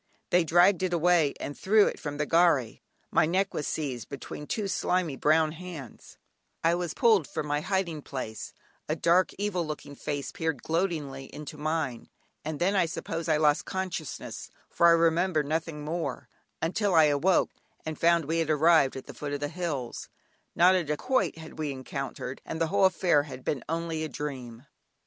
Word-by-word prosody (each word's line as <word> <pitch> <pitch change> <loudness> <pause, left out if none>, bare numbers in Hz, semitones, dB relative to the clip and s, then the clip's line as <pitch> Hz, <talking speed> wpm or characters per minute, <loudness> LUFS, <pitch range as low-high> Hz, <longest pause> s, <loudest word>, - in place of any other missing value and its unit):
They 180 0 +5
dragged 175 +4 +4
it 185 -1 0
away, 170 -3 +3
and 145 - -5
threw 210 +2 +4
it - - -2
from 145 -1 -5
the 150 - 0
gharry. 165 -8 +3 0.3
My 155 - +4
neck 190 +3 0
was 150 - -3
seized 130 -7 -3
between 145 +1 -7
two 210 -3 -2
slimy 180 -5 0
brown 155 +2 +3
hands, 160 -7 -10 0.5
I 165 +1 +4
was 175 -2 -2
pulled 215 -10 +4
from - - -4
my 145 0 -1
hiding 180 -4 -1
place, 130 -6 -6 0.4
a 155 - +1
dark 170 +3 +3
evil 200 -3 -1
looking 150 -2 -6
face 145 -1 -4
peered 160 -5 -3
gloatingly 160 -6 -2
into 150 +2 -9
mine, 150 -5 -2 0.3
and 155 0 -4
then 190 +4 +2
I 180 -3 +3
suppose 165 0 -4
I 155 - +4
lost 150 -1 +3
consciousness, 185 -5 -5 0.2
for 170 - +4
I - - +8
remember 165 0 +3
nothing 155 0 -3
more 165 +2 -3 0.4
until 190 +3 +1
I 160 - +8
awoke, 150 +5 +3 0.3
and 155 0 -3
found 170 -1 +3
we 165 +3 0
had 160 -2 0
arrived 155 -2 +4
at 130 - -7
the - - -9
foot 145 -1 -5
of 145 - -2
the 145 0 -2
hills; 155 -8 -4 0.5
not 180 +2 +6
a 185 -2 +2
dacoit 170 - 0
had 160 -1 -11
we 155 -2 -1
encountered, 135 -1 -5
and 160 - -5
the 165 - +3
whole 200 0 +4
affair 175 -4 +3
had 130 -3 -9
been 140 - -1
only 165 -1 -2
a 155 - -3
dream. 130 -3 -6
160 Hz, 180 wpm, -28 LUFS, 145-175 Hz, 0.5 s, I